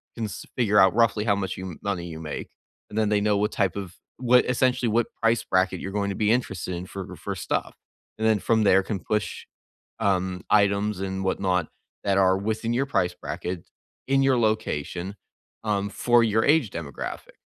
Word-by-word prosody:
can 115 - -2
s 105 - -7
figure 105 -4 +3
out 95 -1 +6
roughly 110 -2 +3
how 100 -3 +3
much 95 -2 -3
you 95 -2 -6
money 100 -4 -2
you 80 -2 -7
make, 75 -2 -6 0.4
and 105 - -7
then 110 -1 +2
they 105 -1 +2
know 105 0 +2
what 105 +1 +1
type 95 -4 0
of 95 -3 -6 0.2
what 125 0 +4
essentially, 125 -1 +1
what 115 +1 +2
price 115 0 +3
bracket 95 0 +1
you're 95 - -5
going 100 0 -1
to - - -4
be 105 +1 +2
interested 95 -7 -1
in 90 +1 -5
for 95 0 -7
for - - -5
stuff. - - -2 0.4
And 110 - +1
then 110 -1 +4
from 110 +2 +2
there, 95 -1 +5
can 100 0 -3
push, 105 +4 -2 0.6
um, 95 -3 0
items 100 0 +3
and 95 0 -3
whatnot 90 -3 0 0.4
that 100 -1 +2
are 95 -1 +4
within 110 +3 -2
your 130 +3 +1
price 90 -10 +1
bracket, 90 0 -5 0.4
in 135 0 +3
your 135 -2 +3
location, 100 -5 -1 0.5
um, 100 -2 -1
for 120 +2 +3
your 110 0 +2
age 145 -7 +3
demographic. 75 -6 -6
100 Hz, 190 wpm, -25 LUFS, 95-110 Hz, 0.6 s, out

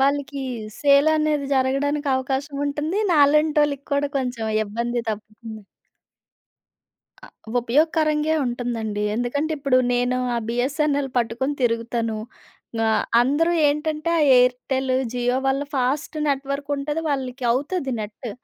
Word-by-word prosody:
వాళ్ళకి 280 0 0 0.4
సేల్ 280 +1 +5
అనేది 305 -2 0
జరగడానికి 280 +3 0
అవకాశం 270 +2 -3
ఉంటుంది. 300 +6 -2
నాలాంటోళ్ళకి 295 -1 +3
కూడా 280 0 +1
కొంచెం 245 -4 -3 0.2
ఇబ్బంది 235 +3 -2
తప్పుతుంది. 215 +1 -8 1.6
అ - - -11 0.3
ఉపయోగకరంగే 305 +4 +2
ఉంటుందండి. 235 -4 -3
ఎందుకంటే 285 +7 -1
ఇప్పుడు, 275 -2 +2 0.2
నేను 245 +1 +1 0.2
ఆ - - 0
బీఎస్ఎన్ఎల్ 275 +3 0
పట్టుకొని 240 +4 -1
తిరుగుతాను 230 -1 0 0.7
ఆహ్, 220 - +2 0.2
అందరూ 290 +7 +2 0.2
ఏంటంటే, 305 +2 -1
ఆ - - +2 0.2
ఎయిర్టెలు 255 +1 +1 0.2
జియో 245 0 0
వల్ల 270 +1 +1
ఫాస్ట్ 270 +4 -1
నెట్వర్క్ 280 0 -2
ఉంటది. 295 +3 -2
వాళ్ళకి 265 -2 -3
అవుతది 275 +2 -2
నెటు, 215 +2 -6
270 Hz, 110 wpm, -23 LUFS, 245-290 Hz, 1.6 s, సేల్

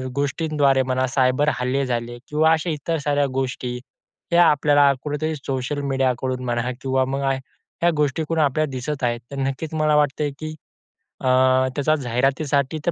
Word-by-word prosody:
गोष्टीद्वारे 140 -1 +1
म्हणा 130 0 0
सायबर 130 +3 +2
हल्ले 130 +2 0
झाले 120 -1 -3
किंवा 155 +2 +3
अशा 160 +2 +1
इतर 160 +1 -2
साऱ्या 145 -1 +2
गोष्टी, 125 -2 -3 0.5
या 175 0 +7
आपल्याला 145 -1 +4
कुठेतरी 155 +1 -2
सोशल 135 0 -3
मीडियाकडून 130 -2 -1
म्हणा 120 +1 -1
किंवा 130 -1 +1
मग 135 +1 -3
ह्या 135 +5 -2
गोष्टीकडून 150 +2 0
आपल्याला 150 +2 +1
दिसत 130 +2 -4
आहेत. 120 -1 0
तर 140 - -6
नक्कीच 135 +4 -3
मला 155 -1 +2
वाटतं 150 0 +1
आहे, 145 - -1
की 155 0 -5 0.7
अ, 130 - -2 0.5
त्याचा 155 +2 +2
जाहिरातीसाठी 135 +3 0
तर - - +4
140 Hz, 155 wpm, -22 LUFS, 130-150 Hz, 0.7 s, या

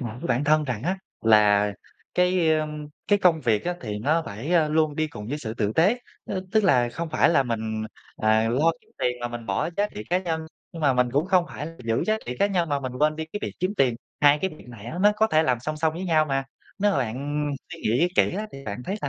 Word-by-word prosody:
nhở 120 -4 -4
với - - -4
bản 125 +4 +1
thân 155 +1 +3
rằng 120 -6 -3
á, 185 +4 0 0.2
là 105 -2 +4 0.4
cái, 180 -2 +3
ờ, 155 - -1 0.4
cái 205 -1 +4
công 170 -4 +3
việc 115 -5 +1
á 175 0 -1
thì 105 -3 -4
nó 155 +8 +1
phải, 115 - -4
a, 160 -3 +4
luôn 155 -1 +1
đi 155 0 +1
cùng 105 -7 -8
với 145 - -3
sự 115 -6 -5
tử 105 -2 -1
tế, 200 +9 +3 0.3
ơ, 190 -2 -3
tức 220 -1 +3
là 125 -10 +4
không 165 +6 -5
phải - - +3
là 155 -5 +4
mình, 110 -2 -3 0.3
à, 110 +1 +2
lo 150 +8 +3
kiếm - - -30
tiền 125 - +1
mà 120 - -2
mình 120 -1 -7
bỏ 95 +10 0
giá 205 +1 +1
trị 105 - -6
cá 180 - +3
nhân, 165 -3 -2 0.3
nhưng 165 -2 -7
mà 140 -2 +4
mình 125 -1 +2
cũng 145 +5 +1
không 185 -2 +3
phải 150 - -6 0.2
giữ 115 0 +1
giá 215 0 +2
trị 125 +1 -4
cá 200 - +4
nhân 175 -5 0
mà 140 -1 0
mình 130 -2 -4
quên 155 +1 +2
đi 160 - -3
cái 205 - -2
việc - - -3
kiếm 185 +3 0
tiền. 130 -8 +3 0.3
Hai 145 0 +6
cái 190 +4 -1
việc - - -15
này 115 -3 -11
á 170 +8 -5
nó 210 +1 +6
có 220 - +4
thể 155 -6 +3
làm 125 -5 +1
song 155 +4 -4
song 155 0 +1
với 185 +2 -4
nhau 155 -3 +3
mà. 135 -2 -1 0.3
Nếu 205 +1 +3
mà - - +1
bạn 140 +5 -2 0.3
suy - - -9
nghĩ 125 +11 +2
kỹ - - +3
á 215 +1 -3
thì 135 0 -10
bạn 105 +4 -5
thấy 195 +8 -3
là - - -1
150 Hz, 270 wpm, -25 LUFS, 120-170 Hz, 0.4 s, Hai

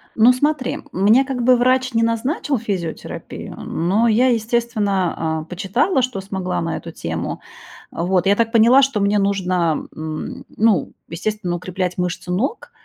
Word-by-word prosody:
Ну, 230 +3 +6
смотри, 285 0 -1
мне 210 +8 +4
как 265 -2 -3
бы 255 +1 +6
врач 255 +1 +2
не 230 0 +2
назначил 255 +5 0
физиотерапию, 190 -7 -5
но 195 +8 0
я, 235 +4 +4
естественно, 210 -9 0
а, - - -6
почитала, 195 - 0
что 250 -5 -2
смогла 190 -2 -3
на 165 -1 -2
эту 165 - -8
тему. 80 - -4 0.5
А 170 - -3
вот, 180 0 +1
я 200 +1 +4
так 225 0 +1
поняла, 235 +4 +6
что 270 -6 +1
мне 200 +1 +2
нужно, 185 -5 0
м, 155 0 -6
ну, 215 -8 +2 0.2
естественно, 180 +1 -3
укреплять 180 0 -3
мышцы 180 0 -3
ног 230 - -2
205 Hz, 155 wpm, -20 LUFS, 180-240 Hz, 0.5 s, Ну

